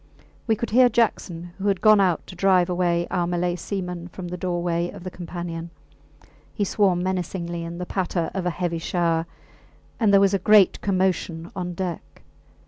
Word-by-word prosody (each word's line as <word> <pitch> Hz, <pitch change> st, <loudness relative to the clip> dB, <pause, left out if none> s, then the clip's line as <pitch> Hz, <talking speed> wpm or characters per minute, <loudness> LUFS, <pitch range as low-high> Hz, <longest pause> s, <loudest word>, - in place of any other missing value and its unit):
We 220 Hz, -, +3 dB
could 235 Hz, +1 st, -4 dB
hear 250 Hz, +2 st, +6 dB
Jackson, 175 Hz, -7 st, -1 dB
who 195 Hz, -, -2 dB
had 195 Hz, -2 st, +2 dB
gone 215 Hz, -1 st, +6 dB
out 180 Hz, -4 st, +1 dB
to 185 Hz, -, -11 dB
drive 180 Hz, -1 st, +3 dB
away 175 Hz, -1 st, +1 dB
our 175 Hz, -2 st, 0 dB
Malay 175 Hz, 0 st, 0 dB
seamen 180 Hz, -1 st, -5 dB
from 180 Hz, 0 st, -8 dB
the 180 Hz, -, -4 dB
doorway 175 Hz, -1 st, -1 dB
of -, -, -10 dB
the 185 Hz, -, -6 dB
companion; 170 Hz, -1 st, -6 dB, 0.9 s
he 210 Hz, -, 0 dB
swore 200 Hz, -1 st, +2 dB
menacingly 175 Hz, -1 st, -3 dB
in 170 Hz, +1 st, -6 dB
the 180 Hz, -, -4 dB
patter 175 Hz, -2 st, -2 dB
of 185 Hz, -2 st, -2 dB
a -, -, +3 dB
heavy 170 Hz, -1 st, -2 dB
shower, 165 Hz, -1 st, 0 dB, 0.7 s
and 220 Hz, -4 st, +3 dB
there 200 Hz, -, +7 dB
was 195 Hz, 0 st, +3 dB
a 195 Hz, -, +2 dB
great 205 Hz, 0 st, +5 dB
commotion 185 Hz, -4 st, -1 dB
on 180 Hz, -2 st, -4 dB
deck. 180 Hz, -2 st, -6 dB
180 Hz, 180 wpm, -24 LUFS, 170-195 Hz, 0.9 s, there